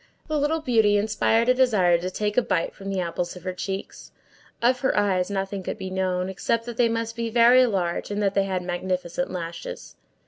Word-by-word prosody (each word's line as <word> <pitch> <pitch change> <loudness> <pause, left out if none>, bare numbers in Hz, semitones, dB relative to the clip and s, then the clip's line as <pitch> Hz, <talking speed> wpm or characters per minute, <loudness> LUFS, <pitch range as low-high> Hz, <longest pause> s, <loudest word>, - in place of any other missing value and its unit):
The 305 -1 0
little 305 +3 0
beauty 220 -6 +3
inspired 220 +2 +1
a 250 - +6
desire 210 -10 +3
to 180 +2 -3
take 210 +2 -2
a 250 - +5
bite 175 -7 -1
from 195 0 -8
the 195 -1 -1
apples 175 0 -3
of 180 - -11
her 185 -1 -3
cheeks. 190 +2 -6 0.5
Of 250 +2 +2
her 265 -3 0
eyes 190 -3 +1
nothing 195 0 -3
could 185 - -5
be 190 -2 -6
known, 185 -1 -1
except 230 +4 -1
that 240 -1 -7
they 240 -2 +3
must 230 0 -2
be 230 0 -2
very 240 +2 +6
large, 180 -6 -2
and 205 0 -2
that 200 -1 +1
they 195 0 +2
had 185 -2 -2
magnificent 180 +5 -2
lashes. 170 -2 -7
200 Hz, 210 wpm, -24 LUFS, 185-230 Hz, 0.5 s, a